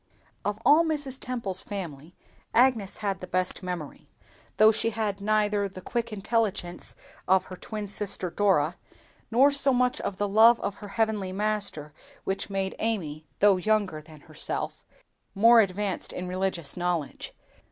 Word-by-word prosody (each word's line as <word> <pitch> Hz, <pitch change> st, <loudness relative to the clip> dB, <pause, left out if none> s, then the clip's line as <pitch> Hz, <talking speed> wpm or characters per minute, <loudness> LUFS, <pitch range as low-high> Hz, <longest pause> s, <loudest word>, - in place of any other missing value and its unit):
Of 205 Hz, 0 st, -2 dB
all 310 Hz, +3 st, +7 dB
Mrs. 290 Hz, -5 st, -3 dB
Temple's 220 Hz, -7 st, -2 dB
family, 170 Hz, -5 st, -7 dB, 0.4 s
Agnes 235 Hz, -5 st, +3 dB
had 195 Hz, -2 st, -1 dB
the 185 Hz, -, -8 dB
best 185 Hz, +2 st, -1 dB
memory; 180 Hz, -5 st, -6 dB, 0.5 s
though 215 Hz, +1 st, +7 dB
she 225 Hz, -, 0 dB
had 210 Hz, -3 st, -3 dB
neither 210 Hz, -1 st, +1 dB
the 185 Hz, -, -10 dB
quick 235 Hz, +5 st, -3 dB
intelligence 205 Hz, -4 st, -2 dB, 0.3 s
of 190 Hz, 0 st, +4 dB
her 185 Hz, -, -8 dB
twin 210 Hz, +3 st, -6 dB
sister 200 Hz, -3 st, +1 dB
Dora, 180 Hz, -4 st, +2 dB, 0.5 s
nor 265 Hz, +5 st, +5 dB
so 280 Hz, -1 st, +3 dB
much 250 Hz, 0 st, +1 dB
of 190 Hz, -, -4 dB
the 205 Hz, -, 0 dB
love 225 Hz, +4 st, +6 dB
of 200 Hz, -, -2 dB
her 205 Hz, -, -9 dB
Heavenly 215 Hz, -4 st, 0 dB
Master 200 Hz, -7 st, -1 dB, 0.3 s
which 195 Hz, +1 st, -3 dB
made 195 Hz, -1 st, -2 dB
Amy, 160 Hz, -9 st, -3 dB
though 200 Hz, -2 st, +5 dB
younger 200 Hz, -5 st, 0 dB
than 155 Hz, -1 st, -15 dB
herself, 155 Hz, +1 st, -4 dB, 0.5 s
more 230 Hz, +3 st, +7 dB
advanced 200 Hz, -1 st, -2 dB
in 180 Hz, -, -5 dB
religious 180 Hz, -5 st, -2 dB
knowledge. 175 Hz, -4 st, -3 dB
200 Hz, 150 wpm, -27 LUFS, 180-220 Hz, 0.5 s, all